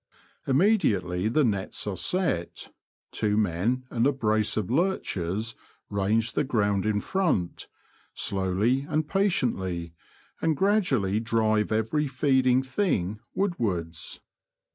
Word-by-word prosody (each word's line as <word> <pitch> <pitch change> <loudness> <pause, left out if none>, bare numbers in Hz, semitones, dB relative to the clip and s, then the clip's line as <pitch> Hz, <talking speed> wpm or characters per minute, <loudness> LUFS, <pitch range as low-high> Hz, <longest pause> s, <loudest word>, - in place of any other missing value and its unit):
Im 135 -1 +3
mediately 100 - +2
the 150 +7 +2
nets 100 -5 -1
are 105 -2 -2
set, 135 - -2 0.4
two 105 -1 0
men 110 +6 0
and 120 +1 +2
a - - +4
brace 110 -6 0
of 110 0 -2
lurchers 110 - -1 0.4
range 105 +3 +1
the - - +1
ground 105 -6 0
in 105 -1 +1
front, 150 - -1 0.5
slowly 100 +7 +1
and 155 0 0
patiently, 95 - 0 0.5
and 160 -3 +1
gradually 135 - +2
drive 110 -2 +1
every 110 +8 0
feeding 130 -1 +2
thing 130 - -1 0.2
woodwards. 95 - -2
110 Hz, 115 wpm, -27 LUFS, 100-140 Hz, 0.5 s, a